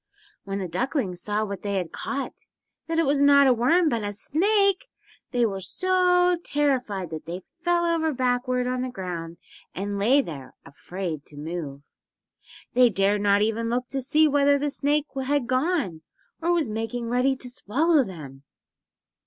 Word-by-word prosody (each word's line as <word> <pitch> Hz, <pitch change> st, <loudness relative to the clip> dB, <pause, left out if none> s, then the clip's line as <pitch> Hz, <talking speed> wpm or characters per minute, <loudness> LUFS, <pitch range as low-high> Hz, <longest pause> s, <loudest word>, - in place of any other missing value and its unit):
When 195 Hz, 0 st, -3 dB
the 190 Hz, -2 st, -3 dB
ducklings 185 Hz, -, -2 dB
saw 210 Hz, +1 st, -1 dB
what 200 Hz, -1 st, -6 dB
they 200 Hz, -1 st, -2 dB
had 180 Hz, -4 st, -2 dB
caught—that 280 Hz, +3 st, -6 dB
it 330 Hz, -, +3 dB
was 280 Hz, 0 st, +2 dB
not 280 Hz, 0 st, +6 dB
a 260 Hz, -, +5 dB
worm 315 Hz, +9 st, +3 dB
but 235 Hz, -6 st, 0 dB
a 205 Hz, 0 st, -3 dB
SNAKE—they 390 Hz, -, 0 dB
were 195 Hz, -3 st, -2 dB
so 360 Hz, -, +2 dB
terrified 250 Hz, -, -1 dB
that 160 Hz, 0 st, -7 dB
they 175 Hz, +2 st, -5 dB, 0.2 s
fell 345 Hz, 0 st, +2 dB
over 330 Hz, -2 st, +1 dB
backward 250 Hz, -1 st, 0 dB
on 250 Hz, 0 st, -1 dB
the 255 Hz, -, -2 dB
ground 175 Hz, -6 st, -6 dB, 0.4 s
and 200 Hz, +1 st, -3 dB
lay 255 Hz, +8 st, +4 dB
there, 145 Hz, -, -9 dB
afraid 165 Hz, +2 st, -6 dB
to 145 Hz, -, -12 dB
move. 150 Hz, -3 st, -6 dB, 0.9 s
They 250 Hz, -1 st, +6 dB
dared 200 Hz, 0 st, +1 dB
not 205 Hz, 0 st, +3 dB
even 225 Hz, +1 st, -1 dB
look 250 Hz, +1 st, -2 dB
to 270 Hz, -, -2 dB
see 305 Hz, +4 st, +3 dB
whether 285 Hz, 0 st, +3 dB
the 290 Hz, +1 st, -1 dB
snake 290 Hz, +1 st, +1 dB, 0.2 s
had 285 Hz, -1 st, 0 dB
gone 255 Hz, -, 0 dB, 0.4 s
or 340 Hz, +1 st, +1 dB
was 340 Hz, -5 st, +1 dB
making 225 Hz, +2 st, -3 dB
ready 250 Hz, +3 st, +1 dB
to 255 Hz, -, -7 dB
swallow 280 Hz, +6 st, +1 dB
them. 150 Hz, -, -9 dB
245 Hz, 160 wpm, -25 LUFS, 195-290 Hz, 0.9 s, not